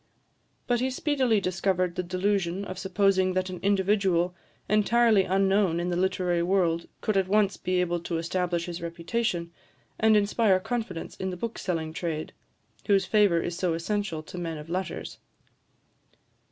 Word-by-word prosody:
But 245 -1 +1
he 260 +2 0
speedily 260 -4 +1
discovered 185 -1 0
the 180 - -2
delusion 185 +1 -1
of 185 -1 -6
supposing 190 -1 +2
that 185 0 -1
an 180 - -6
individual, 190 -3 +2 0.3
entirely 215 -1 +4
unknown 195 -2 +2
in 175 +1 -1
the 175 - -1
literary 180 -1 +1
world, 170 -2 +1
could 215 - 0
at 190 -1 +2
once 200 0 +2
be 185 0 -1
able 175 -1 0
to 170 0 -3
establish 170 0 -1
his 175 -1 -6
reputation, 170 +1 -2 0.5
and 220 -1 +5
inspire 205 -1 +3
confidence 215 -5 -4
in 190 - -3
the 180 - -5
bookselling 175 -7 -3
trade, 160 -2 -4 0.5
whose 200 -2 +3
favour 205 -6 +3
is 175 - -3
so 180 -2 0
essential 170 -2 -2
to 180 - -8
men 165 -2 -4
of 150 +2 -9
letters. 185 +1 -4
185 Hz, 155 wpm, -27 LUFS, 175-205 Hz, 0.5 s, and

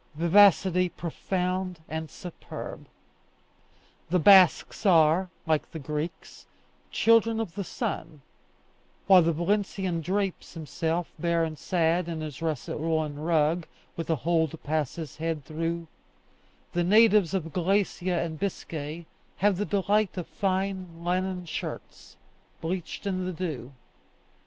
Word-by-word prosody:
Vivacity 180 +1 +5
profound 180 +1 -3
and 160 0 -4
superb! 175 +4 -8 1.2
The 180 - +3
Basques 185 +1 +6
are, 175 -1 +4 0.2
like 155 -2 0
the - - -7
Greeks, 150 +3 -6 0.4
children 230 0 +3
of 215 -7 -3
the 200 - -3
sun; 150 -4 -5 0.8
while 190 -2 +8
the 170 0 +2
Valencian 190 0 -1
drapes 190 +3 -2
himself, 165 +2 -2
bare 170 0 +1
and 160 -1 -3
sad, 170 +2 0
in 165 -1 -4
his 155 -1 -7
russet 155 -5 -3
woollen 155 -2 -1
rug, 160 +1 +1 0.3
with 165 -1 -5
a 160 - +3
hole 160 +3 +1
to 160 - -10
pass 155 -2 -2
his 160 -5 -7
head 160 -3 -3
through, 165 +2 -3 0.9
the 175 - +1
natives 210 -2 +5
of 165 -4 -3
Galicia 185 -1 0
and 160 -2 -6
Biscay 160 -4 -4 0.3
have 200 -1 +2
the 205 - -1
delight 205 0 +1
of 180 - -3
fine 185 -3 -2
linen 180 0 -1
shirts, 160 - -7 0.4
bleached 175 +3 -4
in 185 -2 -1
the 185 - -3
dew. 155 -8 -5
170 Hz, 130 wpm, -27 LUFS, 160-190 Hz, 1.2 s, while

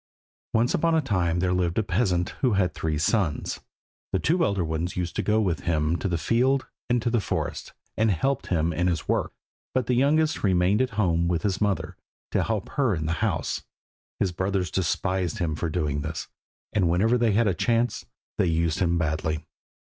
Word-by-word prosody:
Once 115 +2 +3
upon 165 +1 +2
a - - +4
time 90 - 0
there 90 +1 +1
lived 90 -2 0
a 110 - +3
peasant 90 -3 +1
who 125 -4 +3
had 95 -2 +1
three 80 -2 -2
sons. 80 -1 0 0.5
The - - +2
two 165 - +2
elder 100 - +1
ones 80 +3 -3
used 90 -1 -2
to - - +2
go 105 +1 +2
with 90 -8 0
him 80 0 0
to - - -2
the 85 -2 0
field 130 - +2 0.2
and 120 0 +3
to 120 - 0
the 120 - +3
forest, - - -3 0.2
and 110 0 +2
helped 135 - 0
him 85 -2 +1
in 90 +3 +1
his 85 -2 -1
work, - - 0 0.4
but 130 -2 +2
the 125 - +1
youngest 150 +5 +2
remained 95 +2 +3
at 130 - +1
home 85 -4 +2
with 85 -2 0
his 100 -1 -1
mother, 100 -2 -1 0.3
to - - +2
help 110 -3 -2
her 130 -9 +1
in 80 -2 -3
the 80 - 0
house. 100 -8 -1 0.6
His 95 - +1
brothers 95 -1 -1
despised 95 +1 -1
him 85 -5 -1
for 85 +2 -2
doing 75 -4 -1
this, 80 +1 -4 0.5
and 95 -5 +2
whenever 105 +8 +3
they 115 -3 +2
had 115 +2 +3
a 95 - +2
chance 120 +5 0 0.4
they - - +3
used 80 -1 +1
him 85 -2 +2
badly. 80 -1 -1
95 Hz, 200 wpm, -26 LUFS, 85-115 Hz, 0.6 s, a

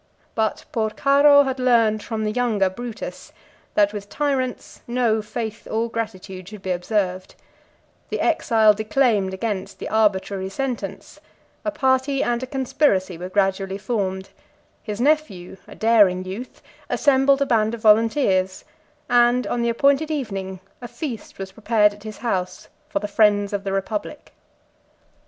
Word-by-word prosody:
But 220 -1 -1
Porcaro 280 +6 +4
had 265 -1 -3
learned 230 -4 +3
from 220 0 -4
the 215 - 0
younger 215 -5 +1
Brutus, 235 +2 -7 0.4
that 205 0 +3
with 205 -1 -7
tyrants 270 -4 -2
no 235 -3 +1
faith 220 +1 -6
or 225 +1 -1
gratitude 190 -5 -6
should 210 -2 -11
be 185 - -2
observed: 185 0 -2 0.7
the - - -3
exile 220 -3 +3
declaimed 215 -2 +1
against 190 0 -4
the - - -6
arbitrary 200 -3 +1
sentence; 255 +4 -5 0.4
a - - 0
party 270 -1 +1
and 240 0 0
a 260 - -4
conspiracy 260 - 0
were 180 +2 -7
gradually 195 0 0
formed: 195 -3 -3 0.5
his 210 0 -6
nephew, 245 - 0
a - - -12
daring 205 -5 +3
youth, 200 +7 -8 0.3
assembled 275 -1 +3
a - - -2
band 225 -3 +1
of 230 - -12
volunteers; 210 -4 +3 0.4
and 245 +1 +3
on 240 - -1
the 235 - +1
appointed 280 +6 +2
evening 195 - -4 0.2
a 240 - -6
feast 245 -5 -7
was 195 0 -6
prepared 210 0 +2
at 205 - -16
his 215 0 -8
house 185 -6 -3 0.2
for 305 - -2
the 295 - -2
friends 205 -1 +2
of 200 -1 -2
the 195 - -3
republic. 205 +8 -4
220 Hz, 145 wpm, -22 LUFS, 195-250 Hz, 0.7 s, Porcaro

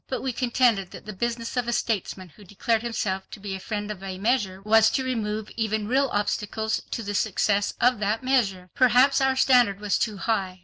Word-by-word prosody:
But 260 - -4
we 260 -2 -2
contended 240 -6 +1
that - - -11
the 215 - -6
business 230 +4 -3
of 245 -2 -1
a 240 - 0
statesman 195 -5 -2
who 205 +7 -17
declared 215 +4 -1
himself 210 -5 -3
to - - -10
be 200 -1 -5
a 190 - -5
friend 210 +1 -4
of 200 -3 -8
a 190 -1 -6
measure 200 -3 0
was 220 +1 +5
to 265 - -1
remove 220 -4 -3
even 220 -2 -1
real 270 +3 +2
obstacles 210 +1 -1
to 230 - -4
the 205 0 -4
success 205 0 0
of 245 -2 +3
that 210 +3 -1
measure. 195 -9 0
Perhaps 255 +2 +4
our 265 0 +2
standard 245 -7 +4
was 210 -1 0
too 215 -3 -1
high. 190 -4 -2
220 Hz, 210 wpm, -25 LUFS, 200-240 Hz, -, was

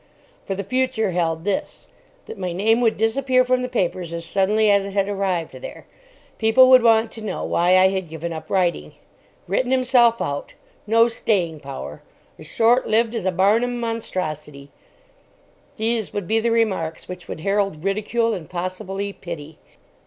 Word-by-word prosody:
For 195 - -3
the 200 - -4
future 225 -2 0
held 165 -2 -1
this: 200 0 -3 0.4
that 210 - -9
my 180 -2 -3
name 220 +6 +2
would 225 -2 +2
disappear 255 +3 +2
from 255 0 +1
the 250 - -3
papers 180 -7 -2
as 170 0 -4
suddenly 205 +4 +2
as 200 -1 +3
it 200 0 -7
had 195 -1 +1
arrived 195 -4 -2
there. - - -9 0.5
People 240 +4 +5
would 255 -1 +8
want 225 -1 +3
to 225 - -9
know 215 - -4
why 180 +2 +3
I 190 0 +5
had 190 -3 -3
given 165 +1 -5
up 160 -1 -8
writing. 175 - 0 0.5
"Written 245 +7 0
himself 250 -3 +3
out," 145 0 -4 0.3
"No 230 +2 +5
staying 185 -9 -1
power," 135 - -8 0.4
"As 155 - -10
short 235 +8 +2
lived 225 +1 +2
as 220 -5 -2
a - - +2
Barnum 220 +7 +2
monstrosity": 155 -11 -5 1.1
these 225 -1 -1
would 200 -4 -4
be 225 +1 +2
the 235 +1 0
remarks 195 -9 -1
which 180 -1 -9
would - - -7
herald 195 -4 -1
ridicule 215 +4 0
and 165 -6 -7
possibly 185 +2 -4
pity. 160 -5 -9
200 Hz, 165 wpm, -22 LUFS, 175-230 Hz, 1.1 s, would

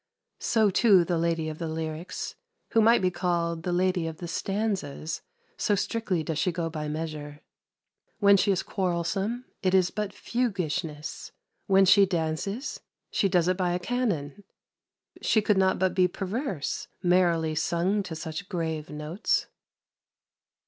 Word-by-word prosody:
So, 220 -3 +3
too, 195 -3 +5
the 170 -1 0
lady 165 -1 0
of 155 0 -5
the 165 - -3
lyrics, 160 +1 -4 0.4
who 225 - +4
might 230 -2 +5
be 180 - +3
called 170 -2 -1
the 180 - -2
lady 180 -1 +1
of 160 -1 -6
the 175 - -6
stanzas, 190 -6 -2 0.4
so 205 - +2
strictly 200 -4 -1
does 160 -1 -2
she 180 - +2
go 165 -1 -3
by 155 -1 -4
measure. 150 -1 -5 0.8
When 200 -1 +6
she 200 +1 +3
is 185 - 0
quarrelsome, 190 +6 -1 0.2
it 185 -1 +2
is 185 -2 +4
but 210 -1 -3
fuguishness; 180 -11 -3 0.3
when 195 -1 +6
she 195 +1 +6
dances, 180 - -2 0.3
she 195 - +2
does 180 -2 +3
it 185 0 +2
by 180 -2 +1
a 180 - 0
canon. 200 - -2 0.8
She 220 - +3
could 210 -2 +2
not 190 0 +3
but 185 -1 +1
be 185 -1 +4
perverse, 195 - -3 0.2
merrily 175 -3 +3
sung 170 +6 +1
to 180 -4 -6
such 160 +4 -6
grave 160 -4 -3
notes. 150 +6 -1
180 Hz, 150 wpm, -27 LUFS, 160-200 Hz, 0.8 s, When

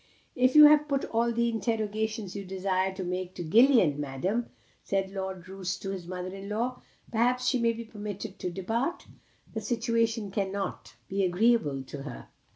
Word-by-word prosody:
"If 255 +1 +3
you 300 0 +11
have 300 0 +6
put 275 -2 0
all 235 +1 +1
the 235 0 +1
interrogations 220 -2 -2
you 200 - -4
desire 190 0 0
to 190 - -4
make 180 +1 -4
to - - -4
Gillian, 215 - +5
Madam," 180 - -2 0.3
said 195 -1 -1
Lord 190 -2 -5
Roos 185 -1 -4
to 195 - -5
his 185 -3 -6
mother 185 0 -5
in 195 +1 -8
law, 240 +4 -2 0.3
"perhaps 245 +2 +2
she 255 - +2
may 230 -1 +2
be 230 +1 -6
permitted 210 -2 -7
to 180 - -2
depart? 225 - -2 0.5
The 220 - -3
situation 230 -2 0
cannot 195 -1 -3
be 195 0 0
agreeable 180 - +2
to 140 +1 -8
her." 135 -4 -8
205 Hz, 170 wpm, -29 LUFS, 185-230 Hz, 0.5 s, you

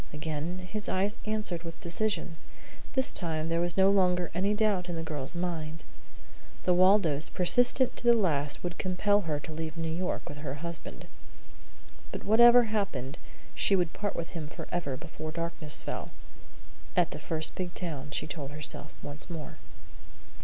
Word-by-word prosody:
Again 155 +3 -3
his 215 -2 0
eyes 200 +3 +1
answered 210 -6 -1
with 165 -1 -8
decision. 175 -1 0 0.6
This 265 -1 +2
time 160 -2 -1
there 165 +1 +1
was 175 0 -1
no 190 +1 +6
longer 180 -3 +3
any 195 +4 +1
doubt 205 -4 +1
in 175 - -2
the 165 - -3
girl's 150 -1 -4
mind. 165 -3 -3 0.8
The 180 - +4
Waldos, 180 -5 +4
persistent 245 +7 +4
to - - -5
the 240 0 +7
last, 150 -9 0
would 175 -1 -4
compel 205 +3 +2
her 150 -1 0
to 160 - -8
leave 160 0 -5
New 165 -1 -2
York 180 +3 -2
with 145 - -7
her 145 -2 -4
husband. 170 +1 -7 1.1
But - - -5
whatever 240 +3 +8
happened 195 - -2 0.3
she 200 - +3
would 175 -3 +1
part 205 0 -2
with 165 - -4
him 160 -3 -5
forever 150 -3 -4
before 155 0 -7
darkness 165 -2 -2
fell. - - -4 0.9
"At - - +4
the - - -5
first 160 -1 +1
big 180 -1 -4
town," 150 -6 -4
she 145 - -1
told 150 -3 -5
herself 150 0 -5
once 145 +4 -7
more. 160 -3 -6
170 Hz, 165 wpm, -30 LUFS, 155-195 Hz, 1.1 s, whatever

